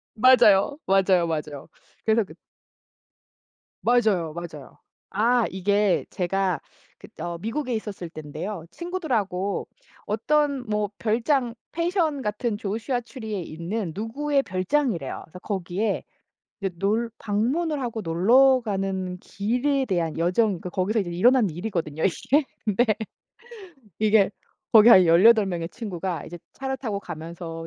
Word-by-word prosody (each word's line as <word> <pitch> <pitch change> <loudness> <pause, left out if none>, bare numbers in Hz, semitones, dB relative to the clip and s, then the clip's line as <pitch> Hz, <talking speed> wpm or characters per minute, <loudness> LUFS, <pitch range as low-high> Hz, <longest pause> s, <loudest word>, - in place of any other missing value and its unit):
맞아요. 240 +1 +5
맞아요, 190 -3 +3
맞아요. 150 -3 -4 0.4
그래서 220 0 +3
그 190 - -13 1.5
맞아요. 215 -10 +2
맞아요. 160 -6 -9 0.3
아 235 +4 +2
이게 200 +1 +1
제가 185 0 -1 0.4
그 - - -13
어 170 0 -3
미국에 245 - -3
있었을 205 -5 -5
땐데요. 160 +4 -6
친구들하고 235 - -2 0.4
어떤 280 +5 +1
뭐 210 -1 0
별장 235 +2 +1 0.2
펜션 335 -5 0
같은 210 +1 -2
조슈아 225 +5 -2
트리에 220 -4 -6
있는 170 +4 -4
누구의 275 +7 0
별장이래요. 185 - -1
그래서 180 +3 -12
거기에 195 +1 -2 0.6
이제 195 -3 -3
놀 220 +4 0
방문을 280 +10 0
하고 235 -4 -3
놀러 240 +10 +4
가는 190 -3 -2
길에 250 +9 -1
대한 170 -7 -1
여정 180 +7 +2
그러니까 180 -2 -4
거기서 200 +5 0
이제 175 -3 -5
일어난 235 +5 +4
일이거든요 165 -4 -3
이게. 275 - +1 0.2
근데 215 +3 +2 1.1
이게 215 -2 +4 0.4
거기 220 +1 +8
한 185 -6 +9
18 200 +6 +6
명의 170 -3 -3
친구가 185 -4 -5
이제 175 +1 -9 0.2
차를 265 0 -4
타고 215 -7 -3
가면서 165 -1 -7
210 Hz, 280 characters per minute, -25 LUFS, 180-240 Hz, 1.5 s, 한